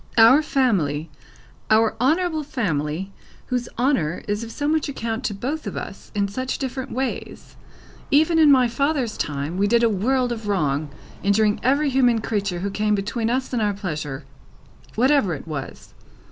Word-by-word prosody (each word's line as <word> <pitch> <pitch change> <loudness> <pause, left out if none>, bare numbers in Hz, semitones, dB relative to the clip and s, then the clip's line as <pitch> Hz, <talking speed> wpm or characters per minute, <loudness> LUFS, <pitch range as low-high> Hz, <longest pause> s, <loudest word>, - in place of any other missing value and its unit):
"Our 230 +6 +8
family; 170 - 0 0.6
our 220 0 +4
honourable 320 +4 +2
family, 190 - -2 0.4
whose 245 -1 -1
honour 225 - 0
is 205 +2 -1
of 230 - -7
so 290 +4 -3
much 310 -1 +1
account 230 -3 -3
to 205 - -1
both 280 +10 -4
of - - -5
us, - - -8
in 200 -1 +1
such 255 +6 -3
different 265 0 -4
ways. 260 +1 -4 0.5
Even 315 +3 +4
in 305 -2 +7
my 255 -3 +5
father's 265 -1 -1
time, 145 +4 -3
we 200 +1 +2
did 235 +2 +3
a 230 - +5
world 245 +5 +1
of 225 -3 -5
wrong, 150 -7 0 0.3
injuring 205 +2 +2
every 280 +3 +2
human 245 -3 +3
creature 200 -5 -2
who 200 +1 -2
came 210 +1 +1
between 220 +3 -2
us 260 +2 -1
and 240 - +1
our 205 -1 +1
pleasure, 155 -8 -5 0.7
whatever 250 - +3
it 145 - -10
was. 145 -4 -7
225 Hz, 165 wpm, -23 LUFS, 195-265 Hz, 0.7 s, Our